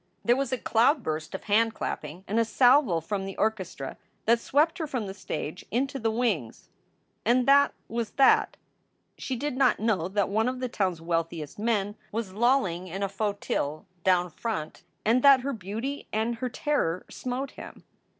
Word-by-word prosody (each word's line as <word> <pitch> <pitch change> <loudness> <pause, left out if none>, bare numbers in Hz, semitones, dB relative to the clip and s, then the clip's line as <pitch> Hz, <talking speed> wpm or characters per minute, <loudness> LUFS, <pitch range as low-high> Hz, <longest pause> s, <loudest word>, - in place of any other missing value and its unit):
There 240 - +5
was 270 -1 -1
a 255 - +1
cloudburst 225 - +1
of - - -6
handclapping 205 -6 -1
and 215 +4 +1
a - - +5
salvo 245 - +4
from 195 +4 -3
the 195 - -7
orchestra 190 -10 -2 0.3
that 230 +1 +4
swept 315 +9 +2
her 320 - -2
from 250 -6 -3
the 190 - -6
stage 170 -3 -5
into 270 +4 -1
the 225 -1 +1
wings. 220 - -2 0.5
And 245 +3 +3
that 280 +1 +5
was 230 -1 -2
tnat! 270 -1 +4 0.6
She 260 - -3
did 285 +2 -3
not 260 -2 +3
know 210 -7 +1
that 200 0 0
one 220 +4 +1
of 255 0 -5
the 255 -1 -2
town 190 -5 0
s 165 - -14
wealthiest 165 -1 -3
men 210 -2 0
was 215 -3 -3
lolling 210 -6 +1
in 190 +3 -4
a - - +1
fauteuil 195 -7 -2 0.2
down 180 -2 +3
front 160 -5 -4 0.2
and 235 +4 +4
that 275 -1 +7
her 275 +2 -2
beauty 225 +7 -5
and 225 +2 -1
her 255 +1 -2
terror 230 - -1
smote 260 +2 -4
him. - - -11
220 Hz, 175 wpm, -27 LUFS, 185-255 Hz, 0.6 s, that